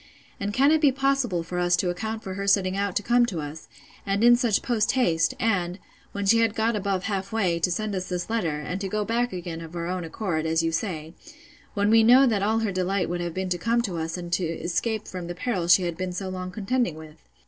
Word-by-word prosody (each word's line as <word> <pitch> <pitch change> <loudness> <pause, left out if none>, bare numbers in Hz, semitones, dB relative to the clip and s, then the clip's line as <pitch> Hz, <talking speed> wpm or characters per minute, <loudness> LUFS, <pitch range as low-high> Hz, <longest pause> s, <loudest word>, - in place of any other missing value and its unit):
And 200 0 -2
can 270 +7 +4
it 315 -1 +3
be 290 -3 +5
possible 270 -9 0
for 180 +2 -4
us 175 0 +3
to 175 +1 0
account 220 +4 -4
for 190 - -5
her 200 +1 -4
setting 195 -1 +3
out 200 -1 -1
to 205 - 0
come 240 +3 +4
to 180 -8 -4
us, 150 +1 -7 0.4
and 200 +2 0
in 240 0 +8
such 240 -4 +1
post 230 -2 +1
haste, 205 -4 +2
and, 185 -7 0 0.3
when 200 0 -3
she 230 +4 +5
had 225 -1 +2
got 225 +1 +1
above 195 -2 -1
half 195 -1 -3
way, 185 -7 +1
to 170 - +1
send 210 +4 -2
us 185 -1 -4
this 180 -1 -3
letter, 175 -10 -1
and 180 +5 -4
to 195 - -2
go 210 +1 -1
back 240 +3 0
again 175 -2 -6
of 165 0 -10
her 170 -1 -4
own 180 0 -3
accord, 165 -2 -2
as 160 +1 +1
you 165 - 0
say; 165 -3 -3 0.6
when 205 +1 +2
we 225 0 +7
know 250 +4 +7
that 220 -6 +1
all 215 +3 +1
her 220 -3 0
delight 185 0 -1
would 175 0 -2
have 170 -1 -4
been 190 0 -2
to 175 -1 -1
come 235 +4 +1
to 185 -7 -3
us 160 +1 -3
and 175 -1 -6
to 185 - +1
escape 175 +7 -2
from 180 -2 -6
the 175 - -5
perils 180 -5 0
she 185 - 0
had 170 -2 -3
been 185 -1 -3
so 190 +1 -4
long 185 0 -5
contending 210 0 -1
with? 155 0 -12
190 Hz, 255 wpm, -25 LUFS, 175-220 Hz, 0.6 s, in